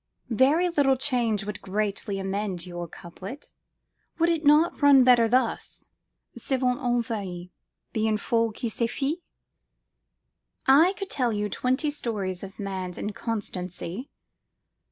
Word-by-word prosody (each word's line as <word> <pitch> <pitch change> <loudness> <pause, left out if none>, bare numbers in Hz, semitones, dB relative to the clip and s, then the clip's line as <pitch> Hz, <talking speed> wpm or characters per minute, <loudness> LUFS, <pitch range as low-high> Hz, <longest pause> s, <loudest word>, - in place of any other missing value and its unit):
'Very 285 +10 +4
little 285 -6 +3
change 240 -6 +1
would 210 -2 -5
greatly 200 +1 -2
amend 195 -2 -3
your 175 -1 -6
couplet: 190 - -10 0.6
would 335 +1 +3
it 330 -2 0
not 305 +4 +4
run 280 -2 +7
better 245 -2 +6
thus 255 +3 -1 0.5
'Souvent 255 -1 0
homme 245 -3 +1
varie, 185 -6 -5 0.4
Bien 220 -1 +1
folle 230 +1 +1
qui 235 - -4
s'y 230 +1 -1
fie?'I 300 +2 -2
could 390 -2 -6
tell 250 -4 +1
you 210 -1 -1
twenty 260 +7 0
stories 205 -10 -3
of 195 0 -9
man's 190 -3 -4
inconstancy."" 205 - -4
230 Hz, 120 wpm, -26 LUFS, 195-270 Hz, 0.6 s, run